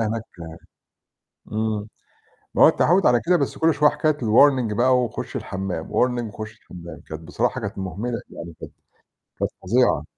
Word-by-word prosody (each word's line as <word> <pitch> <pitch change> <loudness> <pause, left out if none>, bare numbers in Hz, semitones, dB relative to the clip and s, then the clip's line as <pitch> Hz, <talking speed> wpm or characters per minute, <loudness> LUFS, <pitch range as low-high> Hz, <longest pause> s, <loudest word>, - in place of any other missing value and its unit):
هناك 115 0 -1 1.3
إمم. 110 -1 -2 0.7
ما - - +4
هو - - +10
التعوّد 180 +3 +3
على 120 -1 +4
كده 180 +1 +5
بس 140 -5 -2
كل 160 -1 +3
شوية 150 +1 +4
كانت 155 -1 0
الwarning 120 0 +4
بقى 125 +2 +4
وخُش 120 -3 -3
الحمّام، 95 -4 -4
warning 125 -1 +1
وخُش 110 0 -7
الحمام، 85 -3 -11
كانت 80 0 -7
بصراحة 115 +10 -1
كانت 100 -3 -5
مُهمِلة 100 +6 -4
يعني 85 0 -9
كانت - - -9 0.7
كانت - - 0
فظيعة. 95 - +2
115 Hz, 155 wpm, -23 LUFS, 95-130 Hz, 1.3 s, هو